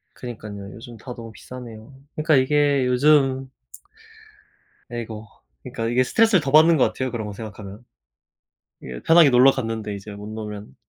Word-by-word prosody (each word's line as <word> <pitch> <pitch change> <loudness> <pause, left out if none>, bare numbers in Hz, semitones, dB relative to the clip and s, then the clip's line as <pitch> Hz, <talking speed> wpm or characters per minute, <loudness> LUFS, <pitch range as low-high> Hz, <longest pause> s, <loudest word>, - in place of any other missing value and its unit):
그러니깐요. 105 -5 -8
요즘 120 0 -11
다 125 +3 -9
너무 115 -1 -10
비싸네요. 115 +2 -11 0.2
그니까 155 -1 +2
이게 140 0 +2
요즘 135 0 +2 1.4
아이고. 110 -2 -7 0.4
그니까 115 - -5
이게 125 +2 +2
스트레스를 220 - +3
더 140 - -2
받는 160 +2 +6
것 130 - +4
같아요. 130 -1 -2
그런 115 -3 -5
거 105 - -6
생각하면. 105 0 -10 1.0
이게 60 -1 -8
편하게 165 -3 +6
놀러 125 +1 +6
갔는데 110 -5 -4
이제 100 +1 -9
못 100 +1 -9
놀면 105 -8 -8
120 Hz, 345 characters per minute, -22 LUFS, 110-135 Hz, 1.4 s, 받는